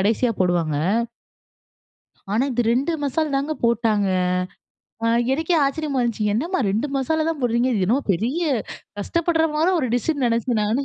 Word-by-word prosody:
கடைசியா 225 Hz, +5 st, +2 dB
போடுவாங்க. 170 Hz, -5 st, +1 dB, 1.6 s
ஆனா 225 Hz, +5 st, +2 dB
இது 245 Hz, -, +1 dB
2 275 Hz, +7 st, 0 dB
மசால் 290 Hz, +1 st, -1 dB
தாங்க 285 Hz, +3 st, -1 dB
போட்டாங்க. 220 Hz, -3 st, +2 dB, 1.0 s
அ -, -, +2 dB, 0.3 s
எனக்கே 320 Hz, +4 st, 0 dB
ஆச்சரியமா 280 Hz, -1 st, -1 dB
இருந்துச்சு. 230 Hz, -3 st, -1 dB
என்னம்மா 330 Hz, -, -1 dB
2 220 Hz, +8 st, 0 dB
மசாலா 315 Hz, +4 st, 0 dB
தா -, -, +2 dB
போட்றீங்க.இது 240 Hz, -3 st, +1 dB
என்னமோ 255 Hz, +8 st, +2 dB
பெரிய 230 Hz, -, -1 dB, 0.6 s
கஷ்டப்பற 325 Hz, -, +1 dB
மாற 315 Hz, +3 st, +2 dB
ஒரு 265 Hz, -, 0 dB
டிஷ்னு 280 Hz, +2 st, 0 dB
நினச்சே 235 Hz, +1 st, 0 dB
நானு. 225 Hz, +7 st, 0 dB
250 Hz, 140 wpm, -22 LUFS, 225-305 Hz, 1.6 s, கடைசியா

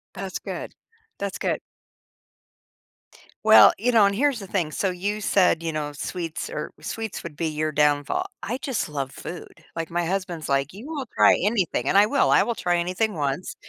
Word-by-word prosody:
That's 190 Hz, 0 st, -5 dB
good. -, -, -6 dB, 0.5 s
That's 200 Hz, -1 st, -3 dB
good. -, -, -1 dB, 1.9 s
Well, -, -, +9 dB
you 245 Hz, -, +1 dB
know, 220 Hz, -4 st, +6 dB
and 200 Hz, -, -1 dB
here's 275 Hz, +1 st, +1 dB
the 195 Hz, -, -8 dB
thing. 175 Hz, -5 st, -1 dB
So, 195 Hz, -, 0 dB
you 200 Hz, +4 st, -3 dB
said, 180 Hz, -5 st, +3 dB
you 165 Hz, -, -2 dB
know, 150 Hz, -1 st, -3 dB
sweets 165 Hz, +2 st, -5 dB
or 150 Hz, -, -5 dB
sweets 225 Hz, -2 st, -5 dB
would 170 Hz, -3 st, -8 dB
be 165 Hz, -, -2 dB
your 155 Hz, 0 st, -1 dB
downfall. 150 Hz, -, +1 dB, 0.2 s
I 245 Hz, -, -3 dB
just 260 Hz, -, -3 dB
love 140 Hz, -2 st, -3 dB
food. 175 Hz, -, -9 dB
Like, 165 Hz, -1 st, -4 dB
my 175 Hz, +1 st, 0 dB
husband's 175 Hz, -3 st, -3 dB
like, 140 Hz, +3 st, 0 dB
"You 225 Hz, +9 st, -10 dB
will 295 Hz, -5 st, -4 dB
try -, -, +6 dB
anything", 185 Hz, -, 0 dB
and -, -, +1 dB
I 205 Hz, +1 st, +7 dB
will. 280 Hz, +3 st, +2 dB
I -, -, +6 dB
will 235 Hz, -, -1 dB
try 175 Hz, -3 st, 0 dB
anything 185 Hz, +5 st, 0 dB
once. 145 Hz, +2 st, -3 dB
180 Hz, 190 wpm, -24 LUFS, 155-210 Hz, 1.9 s, Well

